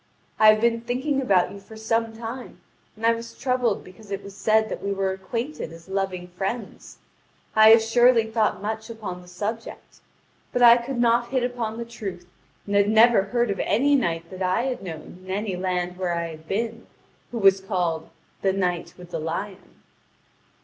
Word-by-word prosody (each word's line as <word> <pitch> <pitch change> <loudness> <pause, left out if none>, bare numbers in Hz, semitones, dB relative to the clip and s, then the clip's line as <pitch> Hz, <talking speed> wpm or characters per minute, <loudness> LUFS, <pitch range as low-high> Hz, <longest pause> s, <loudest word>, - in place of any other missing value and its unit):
I 215 - +7
have 215 - +1
been 230 0 +2
thinking 260 +4 -1
about 195 -8 +3
you 200 - -9
for 220 +3 -13
some 225 +1 0
time, 235 +3 -7 0.4
and 220 +1 -4
I 230 - +5
was 230 0 -8
troubled 250 -5 0
because 185 +3 -15
it 200 0 -4
was 200 0 -10
said 220 +1 +2
that - - -5
we 200 - -1
were 195 -1 0
acquainted 230 - -4
as 165 +1 -13
loving 190 -2 -3
friends. 195 +5 -5 0.6
I 220 0 +8
have 225 0 +8
surely 240 0 +4
thought 220 -3 0
much 220 +2 -4
upon 205 -6 -6
the 180 - -16
subject: 210 +6 -6 0.5
but 245 - +1
I 235 0 +9
could 245 +2 -4
not 240 0 +2
hit 260 -1 0
upon 240 -3 -3
the 235 - -4
truth, 195 -7 -7 0.4
and 205 - -2
had 200 0 +4
never 225 0 +6
heard 240 +1 0
of 195 - -3
any 275 +7 +2
knight 170 -9 -1
that 185 0 -8
I 185 +5 +1
had 260 -1 -2
known 170 -1 -8
in 185 - -13
any 200 0 -2
land 180 -1 -2
where 180 -2 -1
I 170 0 -2
had 160 0 -11
been, 230 +4 -3 0.4
who 240 - -4
was 195 -2 +5
called 175 -4 -2 0.3
'The 190 -1 +2
Knight 180 -3 -2
with 180 -1 -13
the 165 - -3
Lion.'" 175 +5 -5
210 Hz, 190 wpm, -24 LUFS, 185-230 Hz, 0.6 s, I